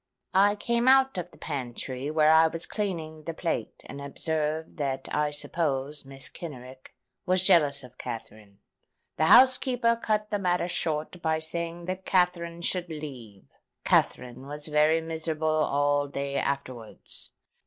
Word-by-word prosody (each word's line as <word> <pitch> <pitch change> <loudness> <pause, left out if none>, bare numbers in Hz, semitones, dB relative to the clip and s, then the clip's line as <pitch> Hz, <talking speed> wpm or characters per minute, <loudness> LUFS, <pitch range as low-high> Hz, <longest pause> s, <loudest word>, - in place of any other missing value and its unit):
I 205 +2 +5
came 235 +3 0
out 265 0 +5
of 175 0 -5
the - - -18
pantry, 130 -1 -5
where 155 0 +4
I 160 0 +7
was 165 +1 -4
cleaning 165 -7 -4
the 165 - -4
plate, 160 -11 -3
and 140 - -8
observed 155 +2 -3
that 135 -3 -2
I 150 0 +1
supposed 145 -2 -2
Mrs. 135 -1 -5
Kenrick 130 -5 -10 0.3
was 185 0 +3
jealous 150 -7 +4
of 125 0 -15
Katherine. 110 -4 -8 0.6
The 155 - +3
housekeeper 250 +2 +5
cut 215 -2 -1
the 205 - 0
matter 180 -2 +1
short 160 0 -3
by 160 -1 +1
saying 170 +2 -5
that 185 +1 -4
Katherine 170 -2 0
should 180 0 -1
leave. 130 - -8 0.4
Katherine 125 +2 +1
was 145 +1 -6
very 155 +1 +3
miserable 160 -1 -3
all 145 -2 +2
day 140 0 -4
afterwards. 130 -5 -5
155 Hz, 145 wpm, -27 LUFS, 140-175 Hz, 0.6 s, I